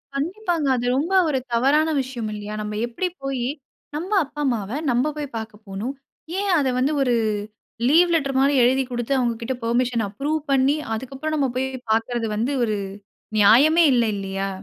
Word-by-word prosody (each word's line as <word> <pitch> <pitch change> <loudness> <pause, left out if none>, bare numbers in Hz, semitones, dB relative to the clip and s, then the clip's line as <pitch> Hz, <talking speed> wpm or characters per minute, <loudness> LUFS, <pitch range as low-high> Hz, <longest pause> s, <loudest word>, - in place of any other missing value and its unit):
கண்டிப்பாங்க. 340 0 -1
அது 245 -1 -2
ரொம்ப 335 +7 -1
ஒரு 270 -4 +1
தவறான 285 +6 +3
விஷயம் 245 -4 -5
இல்லையா? 210 0 -6
நம்ம 210 0 -4
எப்படி 300 +10 -2 0.2
போயி 260 -3 -2 0.5
நம்ம 355 +7 -4
அப்பா, 295 +1 -7
அம்மாவ 220 -6 -1 0.2
நம்ம 255 +6 +1
போய் 295 -1 -3
பாக்க 220 -1 -6
போணும். 200 +8 -4 0.5
ஏன் 405 0 -1
அத 275 - +1
வந்து, 275 +4 +2
ஒரு 250 -3 +2 0.7
லீவ் 340 +5 +5
லெட்டர் 275 -4 0
மாதிரி 275 +2 +3
எழுதிக் 260 +1 +2
கொடுத்து, 240 +2 -1
அவுங்ககிட்ட 240 0 -1
பெர்மிஷன் 235 0 +1
அப்ரூவ் 290 +9 -2
பண்ணி, 275 +2 +3 0.2
அதுக்கப்புறம் 270 +6 -4
நாம 280 -3 +1
போயி 265 - 0 0.2
பாக்கிறது 225 +1 0
வந்து, 235 +7 0
ஒரு 215 -3 0 0.6
நியாயமே 275 +11 +6
இல்ல, 240 - +3
இல்லையா? 195 0 -3
260 Hz, 160 wpm, -23 LUFS, 230-290 Hz, 0.7 s, நியாயமே